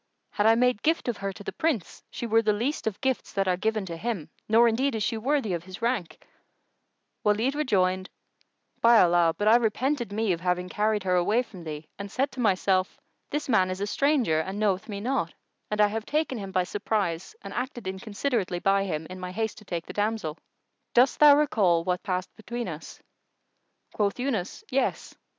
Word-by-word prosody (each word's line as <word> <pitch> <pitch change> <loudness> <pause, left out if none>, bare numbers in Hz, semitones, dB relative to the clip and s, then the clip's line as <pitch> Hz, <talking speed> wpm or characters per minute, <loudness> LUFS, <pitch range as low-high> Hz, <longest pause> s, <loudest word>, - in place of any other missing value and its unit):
Had 210 - +2
I 225 - +6
made 250 -2 +2
gift 325 -2 +1
of 240 - -1
her 195 0 -3
to 205 +2 -11
the - - -4
Prince, 295 - -2
she - - -5
were 225 0 +3
the 215 -1 +2
least 240 +5 -2
of 205 -2 -2
gifts 265 -1 -1
that 195 -1 0
are 180 - +3
given 215 +2 -1
to 170 -2 -5
him, 195 -3 -4 0.2
nor 230 +2 +6
indeed 250 +3 +1
is 215 - -1
she 225 - 0
worthy 235 -2 0
of 170 0 -4
his 185 0 -9
rank," 230 -8 -2 1.0
Walid 220 +5 +2
rejoined, 185 -10 +1 0.7
"By 230 -1 +7
Allah, 170 -2 +4
but 205 - 0
I 225 +2 +8
repented 240 +1 0
me 215 0 0
of 170 -2 -1
having 180 0 -1
carried 210 +1 0
her 185 -1 +1
away 205 +7 +3
from 190 -7 -12
thee 155 -1 -6
and 200 0 -6
said 270 +5 0
to - - -10
myself:—This 195 +7 -1
man 190 -7 +3
is 185 0 -4
a 200 - -1
stranger 250 - +2
and 190 +5 -3
knoweth 205 -1 0
me 200 -1 -4
not, 240 -8 -1 0.3
and 210 - -2
I 210 - +7
have 220 +1 -4
taken 300 -5 0
him 195 -1 -6
by 185 -1 +2
surprise 195 -3 -2
and 195 0 -7
acted 250 -2 -4
inconsiderately 200 0 -2
by 195 +2 +2
him, 160 -4 -3
in 185 +2 -8
my 180 0 -5
haste 220 +3 -3
to 210 - -17
take 170 -3 -4
the - - -8
damsel! 205 -7 -2 0.6
Dost 250 +3 +4
thou 295 -1 +9
recall 195 - +3
what 180 0 -1
passed 185 -2 -3
between 235 +2 -5
us?" 160 -2 -8 0.9
Quoth 205 -2 0
Yunus, 240 -8 -2
"Yes!" 270 +1 -1
210 Hz, 200 wpm, -27 LUFS, 185-235 Hz, 1.0 s, thou